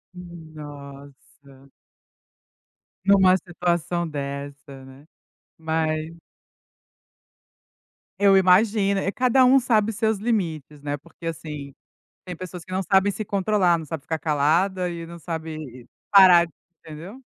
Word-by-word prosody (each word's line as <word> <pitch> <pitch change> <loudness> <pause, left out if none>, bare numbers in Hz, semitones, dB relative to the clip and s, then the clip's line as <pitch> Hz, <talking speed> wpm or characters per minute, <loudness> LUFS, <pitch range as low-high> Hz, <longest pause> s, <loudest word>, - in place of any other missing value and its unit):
Nossa. 145 -5 -13 1.4
Numa 190 -2 +5
situação 175 -1 -2
dessa, 140 -1 -7
né, 135 +2 -15 0.5
mas 160 0 -2 2.0
Eu 200 -1 +5
imagino, 195 +1 +3 0.2
cada 255 +1 +3
um 265 +2 +6
sabe 225 -3 +1
seus 220 0 0
limites, 165 - -3
né, 145 0 -3
porque 170 +3 -16
assim, 150 -4 -6 0.5
tem 180 -1 -6
pessoas 180 0 -9
que 185 - -13
não 190 +1 -1
sabem 195 +1 +2
se 215 - -5
controlar, 195 -3 +1
não 160 - -7
sabem 155 0 -6
ficar 160 +2 -3
calada 170 +5 +1
e 170 -1 -6
não 170 +1 -11
sabe 155 -7 -7 0.2
parar, 180 -4 +7 0.3
entendeu? 175 +12 -11
170 Hz, 110 wpm, -23 LUFS, 150-195 Hz, 2.0 s, parar